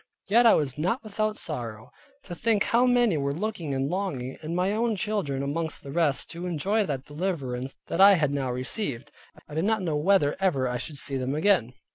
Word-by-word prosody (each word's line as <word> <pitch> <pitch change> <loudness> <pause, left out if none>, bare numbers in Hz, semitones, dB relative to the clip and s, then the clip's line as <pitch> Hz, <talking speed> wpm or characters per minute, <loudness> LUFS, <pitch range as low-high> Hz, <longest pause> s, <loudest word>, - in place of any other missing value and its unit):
Yet 235 +4 +5
I - - +7
was 145 -1 -1
not 185 - 0
without 215 0 -2
sorrow, 115 -8 -5 0.3
to 175 - -8
think 215 +3 +2
how 245 +2 +3
many 240 -8 +3
were 140 0 -1
looking 175 -7 -3
and 135 +1 0
longing, 145 -8 -3
and 160 +2 -4
my 180 +2 +1
own 225 +1 0
children 185 -9 -2
amongst 160 +3 -3
the 140 - -8
rest, 155 -2 +1
to 175 +2 -5
enjoy 200 +6 0
that 135 -2 -3
deliverance 140 -6 -3
that - - -1
I 200 0 +9
had 150 -5 +1
now 135 -2 -1
received, 130 - -3 0.2
and - - -19
I 150 - -12
did 160 +4 0
not 220 -2 +1
know 160 -4 -1
whether 150 -1 +3
ever 140 -10 +1
I 125 0 -2
should 150 +3 -5
see 135 0 -1
them 130 +2 -2
again. 155 - +2
160 Hz, 210 wpm, -26 LUFS, 140-200 Hz, 0.3 s, I